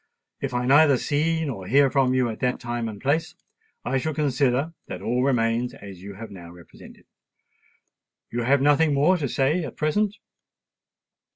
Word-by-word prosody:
If 135 -2 -3
I 125 0 0
neither 140 +1 +5
see 160 +5 0
nor 105 -10 -5
hear 135 +4 +4
from 130 -2 +2
you 130 -1 +2
at 110 - -6
that 125 0 -1
time 120 -1 -3
and 105 -2 -9
place, 145 +7 -1 0.5
I 135 +2 0
shall 155 +2 -3
consider 140 +1 0
that - - -6
all 125 +2 0
remains 120 -2 0
as 100 -3 -11
you 100 +1 -9
have 110 +2 -9
now 90 -3 -10
represented. 85 -2 -15 1.3
You 120 - -2
have 135 +3 +2
nothing 145 +1 +3
more 160 +7 +3
to 145 -6 -3
say 145 +8 +1
at - - -8
present?" 205 +7 0
135 Hz, 170 wpm, -24 LUFS, 120-145 Hz, 1.3 s, neither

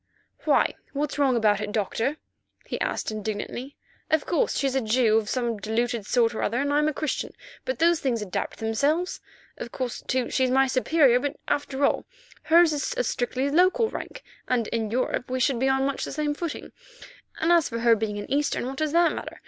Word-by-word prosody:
"Why? - - +3 0.2
What's 290 +1 -2
wrong 270 -3 +3
about 215 -3 +2
it, 210 -1 -3
Doctor?" 225 +7 -1 0.5
he - - -5
asked - - -2
indignantly. 215 +5 -5 0.3
"Of 315 -2 +2
course, 340 - 0
she's 270 -1 0
a 265 - +1
Jew 220 -1 +3
of 215 -1 -6
some 235 -4 -1
diluted 220 +1 -1
sort 235 -2 +2
or - - -4
other, 235 +4 0
and 285 +1 0
I'm 300 +1 +3
a - - +2
Christian; 305 0 -3 0.3
but - - -2
those 335 0 +3
things 250 -4 0
adapt 210 -4 -4
themselves. 285 +11 0 0.4
Of 235 - -7
course, 250 -2 -4
too, 255 -1 0
she's 260 -1 +2
my 265 +1 +4
superior, 260 0 +3
but 285 +2 -3
after 285 -1 0
all - - 0 0.4
hers 330 0 +5
is 300 +12 -2
a - - +2
strictly 260 - -1
local 375 +8 +3
rank, - - -7 0.2
and 235 -4 +1
in 225 -2 -2
Europe 250 +1 -1
we 255 0 -1
should 255 -1 +1
be 265 +2 +2
on 265 0 +2
much 280 0 -2
the - - -4
same 295 +1 -1
footing. 330 +1 -5 0.7
As 335 0 +3
for 230 - -4
her 235 -1 +5
being 210 -1 -3
an 205 - -5
Eastern, 285 -2 0
what 265 +1 -5
does 310 0 -1
that 340 0 +4
matter? - - -7
260 Hz, 200 wpm, -25 LUFS, 230-295 Hz, 0.7 s, hers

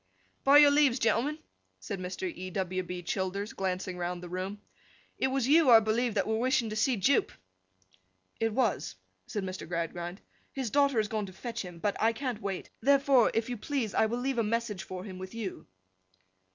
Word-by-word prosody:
'By 280 +1 +7
your 290 -1 +8
leaves, 285 -4 +4
gentlemen,' 245 +6 +1 0.4
said 200 -4 -5
Mr. 185 - -4
E. 185 0 -6
W. 185 0 -2
B. 180 0 -6
Childers, 190 +3 -2
glancing 185 -1 -3
round 175 0 -3
the 175 - -7
room. 185 +3 -4 0.6
'It - - +2
was 265 -2 0
you, 305 0 +5
I 230 -2 +10
believe, 220 +1 0
that 195 -2 +1
were 220 0 0
wishing 250 -2 +1
to - - -3
see 230 +3 +2
Jupe!' 245 +8 +2 1.1
'It 225 0 +1
was,' 220 - 0 0.3
said 205 - -3
Mr. 185 -2 -6
Gradgrind. 175 +2 -4 0.3
'His 260 -5 -3
daughter 280 -3 +3
has 215 -1 +2
gone 210 -2 -2
to 185 - -11
fetch 235 +4 -5
him, 180 -3 -8
but 200 +4 -1
I 225 +1 +3
can't 240 -2 -4
wait; 195 -3 -4
therefore, 275 -2 +5
if 225 0 +1
you 245 -1 -4
please, 240 -2 -2
I 220 - +3
will 235 +2 -2
leave 255 0 -1
a - - +3
message 220 -3 -1
for 185 -1 -7
him 185 -2 -8
with 185 +3 -8
you. 215 -5 -6
220 Hz, 195 wpm, -30 LUFS, 185-250 Hz, 1.1 s, I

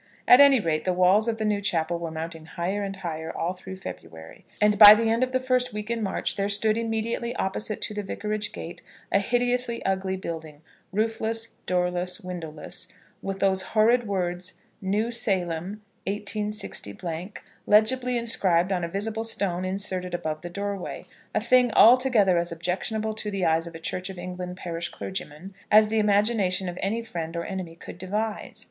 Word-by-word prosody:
At 250 - +9
any 280 -2 +7
rate, 160 -5 -1
the 185 - +1
walls 185 +5 +4
of 225 -1 0
the 220 - -2
new 210 -1 +1
chapel 170 -3 0
were 170 -1 -4
mounting 160 0 -6
higher 185 +5 -2
and 195 -1 -4
higher 165 -4 -5
all 175 +2 -1
through 190 +1 -9
February, 80 - -10
and 210 -1 +3
by 210 -1 +12
the 225 0 +1
end 230 +2 +1
of 255 0 +1
the 260 - +1
first 255 -2 0
week 210 +2 -4
in 230 -1 -1
March 195 -1 -2
there 200 0 0
stood 215 +2 +3
immediately 230 +1 -2
opposite 210 +1 -2
to - - -2
the 210 - -3
Vicarage 210 +1 -3
gate 170 - -8 0.3
a 200 - +4
hideously 245 +2 0
ugly 190 0 0
building, 160 -4 -7 0.3
roofless, 225 +2 -1 0.2
doorless, 180 0 0
windowless; 175 -1 -5 0.3
with 195 0 -4
those 190 -1 +3 0.2
horrid 235 +2 +4
words, 180 -2 -2 0.3
"New 210 +4 0
Salem, 195 -3 -1 0.2
186 210 +1 -2 0.7
" - - -34
legibly 245 +4 +3
inscribed 190 -6 +2
on 180 -2 0
a - - -1
visible 220 +4 -2
stone 195 -5 0
inserted 185 -1 -3
above 155 -3 -3
the 175 - -6
doorway, 200 0 -5 0.3
a - - +4
thing 245 +2 +4
altogether 230 -8 +6
as 170 0 -2
objectionable 190 +6 -2
to 215 -1 -4
the 195 -3 -1
eyes 165 +1 +2
of 170 - -9
a - - -7
Church 185 +3 -4
of 190 - -8
England 180 0 -6
parish 170 -2 -4
clergyman 185 0 -7 0.2
as 215 0 +6
the 220 0 +1
imagination 205 -3 +2
of 175 0 -5
any 225 +4 -1
friend 165 -6 -5
or 170 - -3
enemy 185 -4 -5
could 170 - -11
devise. 210 +3 -3
195 Hz, 180 wpm, -26 LUFS, 180-220 Hz, 0.7 s, by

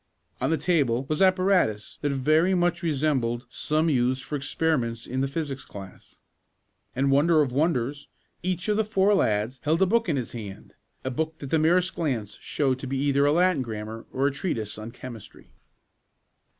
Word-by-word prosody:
On - - +1
the 160 - +2
table 140 -6 +1
was 155 +3 -1
apparatus 185 - +2
that 145 - 0
very 155 +7 +3
much 175 0 +1
resembled 135 -7 0
some 155 +5 0
used 130 -3 +1
for 150 - -4
experiments 135 -5 -1
in 130 +1 -2
the 135 - +1
physics 140 -2 -4
class. 95 -2 -12 0.8
And, 135 +1 +2
wonder 155 +3 +4
of 130 - -3
wonders, 145 -1 0 0.3
each 180 +1 -2
of 210 -1 +2
the 220 - +3
four 205 -1 +2
lads 110 - +1
held 160 +3 +1
a 190 - +5
book 230 +1 +1
in 155 - +1
his 125 - -3
hand 105 -5 -9 0.3
a 130 - -2
book 160 +4 -2
that 140 -3 -8
the 160 - +3
merest 180 +4 +3
glance 125 - -3
showed 135 -3 0
to 135 - -6
be 135 +1 -2
either 140 +1 +2
a - - +4
Latin 175 -2 +3
grammar 110 -1 -6
or 135 +1 0
a 140 - +3
treatise 115 - -3
on 110 +2 -6
chemistry. 120 -2 -11
140 Hz, 180 wpm, -26 LUFS, 125-165 Hz, 0.8 s, a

